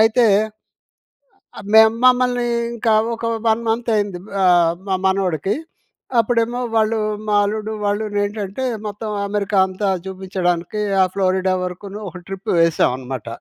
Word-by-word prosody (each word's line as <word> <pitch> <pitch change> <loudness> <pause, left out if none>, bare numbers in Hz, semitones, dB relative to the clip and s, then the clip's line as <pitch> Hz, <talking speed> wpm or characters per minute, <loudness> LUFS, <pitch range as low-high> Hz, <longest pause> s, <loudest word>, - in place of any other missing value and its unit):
అయితే... 225 +1 +4 1.5
మేము 220 0 +7
మమ్మల్ని 250 -1 +3 0.3
ఇంకా 230 -1 +1 0.2
ఒక, 230 - -6 0.2
1 225 +1 +2
మంత్ 230 +2 -1
అయింది. 205 -4 -1 0.2
ఆహ్, 175 -2 +4
మా 190 - +1
మనవడికి 190 -1 0 0.6
అప్పుడేమో 230 +1 +1 0.2
వాళ్ళు 220 0 +2 0.3
మా 210 - +2
అల్లుడు 215 +1 -3
వాళ్ళును 205 0 -1
ఏంటంటే 205 +3 -4 0.2
మొత్తం 210 +1 -5 0.2
అమెరికా 200 0 -1
అంతా 190 +2 -3 0.2
చూపించడానికి, 185 0 -2 0.2
ఆ - - +7
ఫ్లోరిడా 185 -1 +1
వరకును 195 +3 -6
ఒక 180 - -10
ట్రిప్ 195 +3 -6
వేసామన్నమాట. 130 -7 0
205 Hz, 120 wpm, -20 LUFS, 185-220 Hz, 1.5 s, మేము